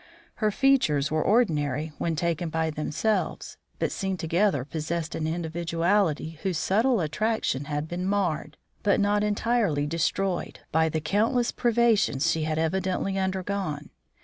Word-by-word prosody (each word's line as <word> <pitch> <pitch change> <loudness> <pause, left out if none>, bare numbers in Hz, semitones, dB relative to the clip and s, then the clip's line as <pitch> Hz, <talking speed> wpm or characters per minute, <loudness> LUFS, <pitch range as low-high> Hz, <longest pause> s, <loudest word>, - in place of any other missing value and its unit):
Her 215 - +2
features 195 - +2
were 155 0 +1
ordinary 155 - +1
when 165 -1 0
taken 170 +1 -1
by 160 0 -1
themselves, 155 +8 -2 0.2
but - - -1
seen 190 -2 -2
together 165 -4 +1
possessed 160 +2 -3
an 155 - -2
individuality 165 0 0
whose 190 -4 -1
subtle 220 - +2
attraction 160 - -1
had 150 +1 -3
been 180 +2 -3
marred, 195 -6 -1 0.2
but 205 - +2
not 205 0 +2
entirely 210 -7 +1
destroyed, 170 +4 -1
by 160 +1 +3
the 155 0 -2
countless 230 - +1
privations 225 - +2
she 160 -1 -1
had 155 0 -1
evidently 185 +3 0
undergone. 190 -5 -2
170 Hz, 135 wpm, -26 LUFS, 155-205 Hz, 0.2 s, by